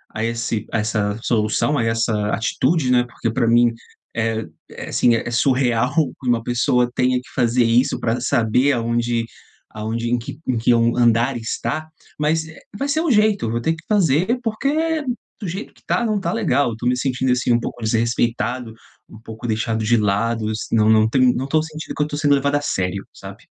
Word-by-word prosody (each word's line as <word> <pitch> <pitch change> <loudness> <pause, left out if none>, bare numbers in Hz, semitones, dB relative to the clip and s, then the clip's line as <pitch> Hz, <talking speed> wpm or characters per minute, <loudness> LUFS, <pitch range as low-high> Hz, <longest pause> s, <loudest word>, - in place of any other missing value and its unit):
a 110 - -2
esse 115 -1 -2
a - - 0
essa 105 -1 -1
solução, 115 +6 +1
a 115 - +1
essa 115 0 0 0.2
atitude, 130 +6 0
né, 125 -1 +4
porque 120 -1 -4
pra 115 +1 0
mim, 120 +1 +4 0.4
eh, 115 -1 -1 0.3
é - - -8
sim, 120 - +3
é 115 - -2
surreal 125 -1 +2 0.3
que 130 - -6
uma 120 -1 +2
pessoa 120 0 +1
tenha 125 0 +2
que - - -19
fazer 120 0 +2
isso 120 +3 +2
pra 115 +1 -1
saber 125 +3 +2
aonde 120 -1 0 0.5
aonde 115 +2 -3
em 120 - +2
que 120 - -8
em 130 - +1
que 115 +2 +2
on 115 0 +3
um - - -5
andar 120 +2 +3
está. 120 +6 -3 0.3
Mas, 160 +1 +1
eh, 160 - -13 0.2
vai 280 - -2
ser 285 +3 +1
o 335 - 0
jeito, 210 - +3
eu - - -2
vou 115 - -1
ter 160 +7 +1
que 160 - -14
fazer, 190 - +2
porque 300 +8 0 0.4
do 200 - -4
jeito 190 +6 -6
que - - -25
tá, 240 - 0
não 215 -2 0
tá 195 - -2
legal, 180 - +1
eu 115 - -6
tô 120 - -7
me 125 - +3
sentindo, 130 0 0
assim, 125 0 +1
um 120 - +4
pouco 120 - -6
desrespeitado, 115 +1 0 0.4
um 110 - -13
pouco 110 +1 -8
deixado 110 0 -1
de 120 +2 +3
lado 110 +2 0
is 110 - -4
não 110 -1 +3
não 110 0 +4
tem 130 0 +4
não 130 +2 -2
tô 155 +2 +2
sentindo 155 0 -7
que 150 - +1
eu - - -2
tô 145 - -5
sendo 145 -1 +3
levado 140 +1 0
a 145 - +1
sério, 95 -7 -2
sabe? - - -11
120 Hz, 210 wpm, -20 LUFS, 115-145 Hz, 0.5 s, né